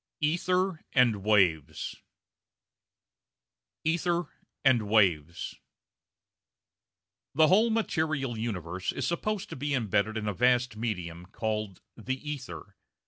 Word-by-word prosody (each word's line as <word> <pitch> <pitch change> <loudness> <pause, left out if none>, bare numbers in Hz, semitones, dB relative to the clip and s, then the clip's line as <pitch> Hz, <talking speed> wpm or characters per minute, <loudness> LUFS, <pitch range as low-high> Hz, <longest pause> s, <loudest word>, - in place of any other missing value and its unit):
ETHER 175 +3 +1
AND 120 -6 +4
WAVES 95 -8 +2 1.9
Ether 170 +2 0 0.3
and 120 -6 +4
Waves 85 -6 +2 1.8
The 155 +1 +5
whole 215 +6 +5
material 155 - 0
universe 95 -5 -3
is - - -3
supposed 200 +4 -2
to - - -5
be 145 +2 -1
embedded 110 -2 0
in 105 -1 -3
a 105 - 0
vast 125 +1 +2
medium 90 -6 -4
called 105 -2 -3
the 125 +4 -3
ether. 140 -4 -7
120 Hz, 100 wpm, -29 LUFS, 100-155 Hz, 1.9 s, The